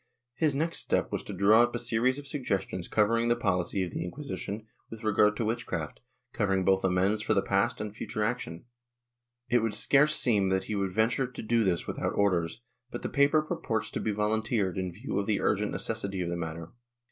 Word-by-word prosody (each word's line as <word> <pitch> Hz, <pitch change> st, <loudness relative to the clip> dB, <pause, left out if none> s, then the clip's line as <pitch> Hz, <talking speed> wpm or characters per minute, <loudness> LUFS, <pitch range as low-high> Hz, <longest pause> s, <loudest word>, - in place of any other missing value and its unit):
His 150 Hz, 0 st, +1 dB
next 165 Hz, +4 st, 0 dB
step -, -, 0 dB
was -, -, -2 dB
to -, -, -6 dB
draw 105 Hz, +3 st, +5 dB
up 120 Hz, 0 st, +1 dB
a -, -, +1 dB
series 120 Hz, +2 st, +1 dB
of 145 Hz, -, -8 dB
suggestions 100 Hz, -, -2 dB
covering 115 Hz, +2 st, +2 dB
the 120 Hz, -, +3 dB
pohcy 95 Hz, -4 st, 0 dB
of 85 Hz, -, -8 dB
the -, -, -3 dB
Inquisition 110 Hz, -1 st, -5 dB, 0.2 s
with 115 Hz, 0 st, -9 dB
regard 105 Hz, 0 st, +3 dB
to 115 Hz, -, -1 dB
witchcraft, 115 Hz, +2 st, -3 dB, 0.3 s
covering 95 Hz, -2 st, +1 dB
both 95 Hz, 0 st, +3 dB
amends 95 Hz, +3 st, +2 dB
for 110 Hz, -, +1 dB
the 100 Hz, -, +3 dB
past 100 Hz, +5 st, +1 dB
and 105 Hz, 0 st, -5 dB
future 110 Hz, 0 st, -3 dB
action. 105 Hz, -7 st, -3 dB, 0.8 s
It 120 Hz, -1 st, +3 dB
would 110 Hz, -2 st, 0 dB
scarce 145 Hz, +7 st, +4 dB
seem 105 Hz, -6 st, +3 dB
that 95 Hz, 0 st, +1 dB
he 105 Hz, -, -5 dB
would 100 Hz, -2 st, -1 dB
venture 115 Hz, +6 st, +1 dB
to 125 Hz, -, -8 dB
do 115 Hz, +1 st, +2 dB
this 90 Hz, -4 st, 0 dB
without -, -, -3 dB
orders, 95 Hz, +1 st, 0 dB, 0.3 s
but -, -, -7 dB
the -, -, -2 dB
paper 145 Hz, +2 st, +3 dB
purports 155 Hz, -, -3 dB
to -, -, -3 dB
be 110 Hz, -, -1 dB
volunteered 105 Hz, -2 st, 0 dB
in 95 Hz, -1 st, -2 dB
view 105 Hz, +5 st, -3 dB
of 100 Hz, -, -3 dB
the 105 Hz, -2 st, +1 dB
urgent -, -, +1 dB
necessity 95 Hz, -2 st, -2 dB
of 85 Hz, -, -2 dB
the 85 Hz, -, -2 dB
matter. 85 Hz, 0 st, -5 dB
105 Hz, 205 wpm, -29 LUFS, 95-120 Hz, 0.8 s, draw